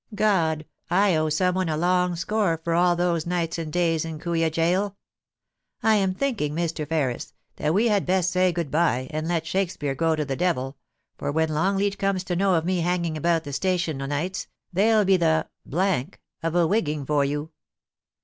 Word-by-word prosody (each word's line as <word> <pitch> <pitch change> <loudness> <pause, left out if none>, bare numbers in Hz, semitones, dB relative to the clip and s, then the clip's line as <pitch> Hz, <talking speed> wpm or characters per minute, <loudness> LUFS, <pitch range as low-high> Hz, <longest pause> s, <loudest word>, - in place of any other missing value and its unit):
God! 170 -7 +1 0.2
I 190 0 +3
owe 155 0 +1
some 180 +4 +1
one 185 -2 -1
a 155 - 0
long 180 +1 +2
score 175 -1 0
for 170 - -1
all 175 +1 +4
those 170 -2 0
nights 170 -1 -1
and 160 -2 -4
days 165 -2 +1
in 165 -1 -5
Kooya 165 0 0
Gaol 180 +5 0 0.9
I 220 - +5
am 190 -3 +2
thinking, 205 - -1
Mr. 165 -2 -2
Ferris, 140 -7 -2 0.2
that 155 +3 0
we 225 +4 +3
had 205 -4 +1
best 185 -1 +2
say 185 0 +3
good 170 -4 -3
bye, 150 -5 +1
and 155 +1 -3
let 170 -2 -1
Shakespeare 170 -6 -1
go 165 +3 +1
to 150 -1 -2
the 135 -1 -2
devil, 135 -5 -1 0.4
for - - -2
when 160 +1 +1
Longleat 195 +6 0
comes 195 -2 0
to 180 -1 -2
know 190 0 +2
of 160 -1 0
me 185 0 +1
hanging 170 -1 0
about 165 +1 +1
the 145 -2 -7
station 170 -2 -1
o' 135 - -3
nights, 155 +7 -3 0.3
there'll 210 +3 +4
be 190 0 +4
the 160 -2 +2 0.9
of 165 +1 -2
a 175 -1 +4
wigging 155 -6 0
for 145 0 +2
you.' 145 +3 -3
170 Hz, 190 wpm, -25 LUFS, 155-185 Hz, 0.9 s, I